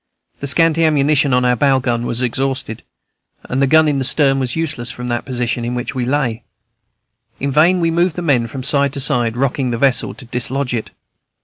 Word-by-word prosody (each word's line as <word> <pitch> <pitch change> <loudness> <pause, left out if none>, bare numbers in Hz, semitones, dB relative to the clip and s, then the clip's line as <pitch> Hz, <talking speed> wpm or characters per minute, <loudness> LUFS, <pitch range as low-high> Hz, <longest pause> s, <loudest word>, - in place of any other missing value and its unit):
The 140 - -4
scanty 165 +3 +3
ammunition 145 -2 +2
of 125 0 +2
our 125 0 +3
bow 135 +2 +3
gun 120 -2 -2
was 120 +2 -2
exhausted, 130 -1 -2 0.6
and 130 +2 -2
the 140 - +3
gun 160 +2 +4
in 145 -2 0
the - - -1
stern 135 0 +2
was 130 -2 -2
useless, 150 -7 -2
from 125 0 -6
the 120 0 -1
position 120 -2 -3
in 120 +1 -3
which 125 - -4
we 125 -2 -2
lay. 125 -4 -1 1.0
In 140 +1 -2
vain 165 +6 +4
we 165 -1 +1
moved 170 0 +1
the 175 - -4
men 130 -7 +1
from 130 +3 -7
side 140 0 +2
to 140 - -4
side, 120 -3 0
rocking 135 0 -1
the 120 - -2
vessel, 130 0 +1
to 130 - -12
dislodge 125 +2 -2
it. 115 -2 -3
135 Hz, 210 wpm, -17 LUFS, 125-145 Hz, 1.0 s, gun